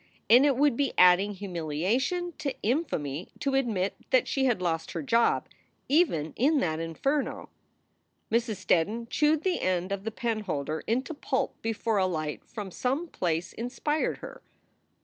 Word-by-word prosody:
And 255 +5 +8
it 275 -3 +2
would 285 -2 +3
be 275 +1 0
adding 185 +3 +5
humilia 180 - -1
tion 350 +4 -2
to 280 -2 -2
infamy 185 - -1
to 275 -2 -1
admit 220 -8 +1 0.2
that 255 -2 +3
she 270 -1 +1
had 240 -7 +2
lost 165 -2 -2
her - - -3
job 235 -3 +2 0.4
even 215 - +2
in 290 +4 +3
that 160 -2 -1
inferno. 270 - -2 0.8
Mrs. 230 -1 +1
Steddon 220 +8 +1
chewed 300 +1 +2
the 370 -2 0
end 185 0 0
of 200 -1 -2
the 225 - -2
penholder 205 - -2
into 255 +7 0
pulp 265 -2 -1
before 225 -1 -1
a 190 - +3
light 155 -4 -3
from 205 -4 -7
some 275 - -1
place 170 - -2
inspired 270 +6 -1
her. - - -10
225 Hz, 155 wpm, -28 LUFS, 180-270 Hz, 0.8 s, And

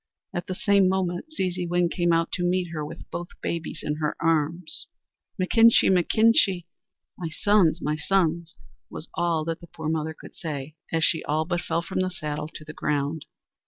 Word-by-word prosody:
At 175 -1 -3
the 185 - -3
same 200 -1 +4
moment, 185 - -1
Zeezeewin 180 - 0
came 175 -1 +1
out 165 0 +2
to 175 - -1
meet 180 0 +1
her 155 -2 -3
with 150 - -8
both 175 0 -6
babies 170 -1 -4
in 150 0 -2
her 155 -1 -1
arms. 165 0 0 0.5
"Mechinkshee! 225 +3 +5
mechinkshee! 190 -1 +4 0.5
(my 170 -3 -3
sons, 175 -2 +3
my 150 +1 0
sons!)" 170 0 0 0.3
was 155 - -8
all 165 -3 0
that 165 0 -3
the 170 - -11
poor 160 -1 -5
mother 160 0 -1
could - - -12
say, 150 -3 -5 0.2
as 165 -1 +1
she 160 - +1
all 155 +2 0
but 175 0 -1
fell 165 +1 -1
from 185 - -3
the 185 0 +1
saddle 150 -4 -4
to 155 - -8
the 150 - -8
ground. 150 +1 -1
170 Hz, 180 wpm, -26 LUFS, 155-180 Hz, 0.5 s, Mechinkshee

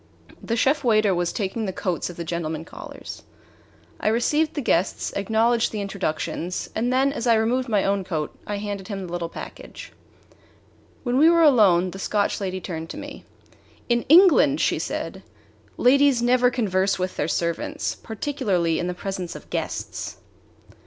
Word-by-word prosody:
The 230 - -2
chef 275 +5 +2
waiter 215 -4 +3
was 175 -1 0
taking 215 +2 -2
the - - -1
coats 180 -2 -2
of 175 - -10
the 170 - -4
gentlemen 160 -1 -3
callers. - - -9 0.8
I - - -2
received 295 +8 +1
the - - -1
guests, 185 -6 0
acknowledged 225 +3 +2
the 215 - -4
introductions, 185 -2 -3
and 240 +3 0
then, 270 +2 +2
as 245 -4 -3
I 230 - +5
removed 240 +3 +1
my 205 -3 +2
own 195 0 0
coat, 155 -5 -3
I 205 - -2
handed 200 -2 -5
him 195 -3 -5
the 175 - -9
little 170 -1 -3
package. - - -10 1.1
When 250 0 +1
we 315 +3 +7
were 335 0 +5
alone 195 - +5
the 195 - -9
Scotch 205 +1 0
lady 185 -1 -2
turned 165 -3 -6
to - - -7
me. - - -9 0.6
"In 235 0 +3
England," 310 -4 +6
she - - +1
said, - - -4 0.6
"ladies 275 0 +4
never 245 +1 +4
converse 195 -5 0
with 185 0 -3
their 150 - -1
servants, 170 +1 -2
particularly 195 - -1
in 175 - -2
the 180 - -3
presence 185 -2 -5
of - - -12
guests." - - -4
205 Hz, 165 wpm, -24 LUFS, 180-245 Hz, 1.1 s, we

